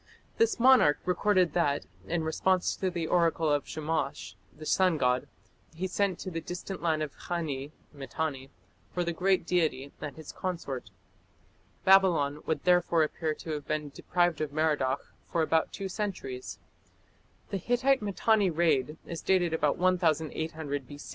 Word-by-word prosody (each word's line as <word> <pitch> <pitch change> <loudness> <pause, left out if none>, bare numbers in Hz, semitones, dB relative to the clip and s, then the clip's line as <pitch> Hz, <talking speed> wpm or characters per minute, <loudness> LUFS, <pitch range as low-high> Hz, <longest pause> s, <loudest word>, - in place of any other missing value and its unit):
This 455 - +3
monarch 240 - +6
recorded 180 -2 +2
that, 145 -5 +1 0.2
in 165 -1 -1
response 180 +3 +1
to 190 - -1
the 170 -2 -3
oracle 165 -2 +2
of 145 -1 0
Shamash, 155 -8 -3 0.2
the 155 +9 -11
sun 185 0 +3
god, 125 -2 +1 0.5
he 180 +3 -3
sent 190 -1 0
to 185 - -5
the 165 -1 -3
distant 180 +3 -6
land 160 -2 +1
of 150 - -5
Khani 150 -6 -3 0.2
(Mitanni) 135 0 -4 0.4
for 180 - -1
the 170 0 -2
great 185 +1 +2
deity 155 -6 0
and 145 -3 -5
his 160 -2 -9
consort. 165 - -4 1.0
Babylon 170 -7 +4
would 160 - -1
therefore 175 -2 +4
appear 155 0 -2
to 160 - -7
have 150 -2 -4
been 155 -1 -2
deprived 175 +2 0
of 150 -2 -2
Merodach 150 -4 +1 0.3
for 165 - 0
about 160 0 +1
two 195 - -4
centuries. 185 - -4 0.9
The 195 - 0
Hittite 250 +6 +2
Mitanni 210 0 +2
raid 155 -3 +1
is 170 - -6
dated 180 -3 +2
about 150 -3 +1
1800 160 -5 0
B. 145 - -9
165 Hz, 150 wpm, -29 LUFS, 150-185 Hz, 1.0 s, monarch